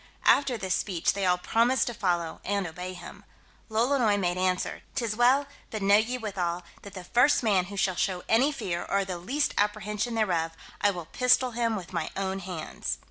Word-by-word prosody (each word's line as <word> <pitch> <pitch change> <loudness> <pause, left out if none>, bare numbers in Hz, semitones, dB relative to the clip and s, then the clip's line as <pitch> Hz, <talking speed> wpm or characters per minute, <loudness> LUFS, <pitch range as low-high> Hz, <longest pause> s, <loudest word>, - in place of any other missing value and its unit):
After 275 -4 +4
this 190 -3 -1
speech, 180 -4 0
they 195 -1 -1
all 180 0 +3
promised 235 +7 +2
to 240 - -3
follow, 175 -6 -1
and 200 -1 -1
obey 180 +2 -6
him. 175 - -11 0.5
Lolonois 225 -1 +2
made 175 -3 0
answer, 185 0 -1
"'Tis 230 -3 -1
well; 255 +5 +4 0.2
but 215 -2 -4
know 200 +1 +6
ye, 230 +4 0
withal, 180 -6 -3 0.2
that 200 0 -11
the 185 - -7
first 245 +9 +3
man 195 -5 +3
who 200 +2 -8
shall 190 -1 +2
show 180 -1 -1
any 255 +6 +4
fear, 175 -11 -3
or 200 0 +1
the 180 -2 -5
least 270 +12 -1
apprehension 210 +2 -1
thereof, 170 -7 0 0.3
I 205 - +4
will 175 -4 -4
pistol 250 +5 +3
him 230 -1 0
with 185 -3 -7
my 170 -3 -2
own 195 0 -2
hands." 180 -4 -4
200 Hz, 190 wpm, -27 LUFS, 180-230 Hz, 0.5 s, know